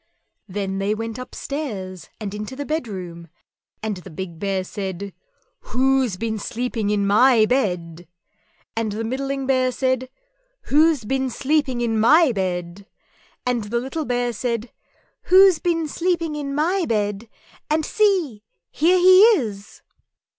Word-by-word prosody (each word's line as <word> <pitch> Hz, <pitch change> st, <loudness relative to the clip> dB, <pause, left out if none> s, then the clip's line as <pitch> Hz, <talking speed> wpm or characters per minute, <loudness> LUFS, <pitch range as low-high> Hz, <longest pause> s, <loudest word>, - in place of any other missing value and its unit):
_" -, -, -46 dB, 0.5 s
Then 195 Hz, -1 st, -2 dB
they 200 Hz, +2 st, 0 dB
went 225 Hz, +1 st, -5 dB
upstairs 215 Hz, -, -6 dB
and 205 Hz, -3 st, -5 dB
into 210 Hz, +5 st, -6 dB
the 285 Hz, +1 st, -5 dB
bedroom, 185 Hz, -, -5 dB, 0.6 s
and 215 Hz, -3 st, -2 dB
the 180 Hz, -, -11 dB
big 170 Hz, 0 st, -7 dB
Bear 195 Hz, -1 st, -1 dB
said, 195 Hz, 0 st, -6 dB, 0.5 s
"WHO'S 260 Hz, -5 st, +1 dB
BEEN 220 Hz, +1 st, -3 dB
SLEEPING 230 Hz, -1 st, -3 dB
IN 205 Hz, -1 st, +1 dB
MY 220 Hz, +3 st, +5 dB
BED?" 180 Hz, -9 st, -1 dB, 0.7 s
and 225 Hz, -2 st, -1 dB
the 220 Hz, +2 st, -3 dB
middling 270 Hz, +3 st, -3 dB
Bear 255 Hz, -1 st, +2 dB
said, 260 Hz, 0 st, -1 dB, 0.6 s
"WHO'S 300 Hz, -4 st, +3 dB
BEEN 265 Hz, +3 st, -1 dB
SLEEPING 270 Hz, -1 st, 0 dB
IN 225 Hz, -2 st, 0 dB
MY 305 Hz, +6 st, +5 dB
BED?" 185 Hz, -1 st, -3 dB, 0.6 s
and 245 Hz, -3 st, 0 dB
the 235 Hz, +3 st, -1 dB
little 270 Hz, +5 st, -4 dB
Bear 245 Hz, -1 st, -1 dB
said, 230 Hz, +1 st, -3 dB, 0.6 s
"_Who's 375 Hz, -2 st, +7 dB
been 330 Hz, -2 st, 0 dB
sleeping 335 Hz, -1 st, -1 dB
in 280 Hz, -2 st, -4 dB
my 345 Hz, +5 st, +1 dB
bed? 210 Hz, 0 st, -1 dB, 0.4 s
and 310 Hz, 0 st, +1 dB
see 360 Hz, -, +1 dB, 0.3 s
here 345 Hz, +5 st, +3 dB
he 370 Hz, +1 st, +7 dB, 0.2 s
is! 205 Hz, -5 st, -7 dB
240 Hz, 140 wpm, -22 LUFS, 205-280 Hz, 0.7 s, Who's